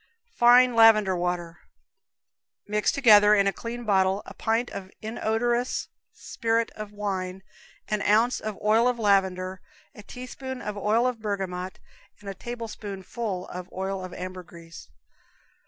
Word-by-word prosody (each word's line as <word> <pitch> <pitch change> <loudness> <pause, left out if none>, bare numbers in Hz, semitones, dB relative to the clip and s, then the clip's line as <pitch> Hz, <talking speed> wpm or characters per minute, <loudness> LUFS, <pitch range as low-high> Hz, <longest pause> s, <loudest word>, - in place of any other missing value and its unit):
Fine 245 - +6
Lavender 215 -4 +6
Water. 175 -1 -3 1.1
Mix 210 0 +1
together, 210 -5 +6
in 200 -1 +3
a 195 - +1
clean 240 +1 -6
bottle, 190 -1 +2
a - - -10
pint 225 +2 -1
of 190 -1 -7
inodorous 235 +2 -1 0.2
spirit 230 0 -2
of 215 -1 -8
wine, 190 -2 -4 0.4
an 210 -1 -1
ounce 225 +5 +3
of 215 -2 -5
oil 220 +3 +4
of 250 -1 0
lavender, 190 -3 +1 0.3
a - - -12
teaspoonful 255 +3 -8
of 210 - -3
oil 215 +4 +1
of 250 -2 -1
bergamot, 190 -3 -4 0.4
and 205 - -14
a 195 - -4
tablespoonful 210 -3 -6
of 180 0 -8
oil 190 0 -4
of 185 - -7
ambergris. 180 -2 -9
210 Hz, 135 wpm, -26 LUFS, 190-230 Hz, 1.1 s, Fine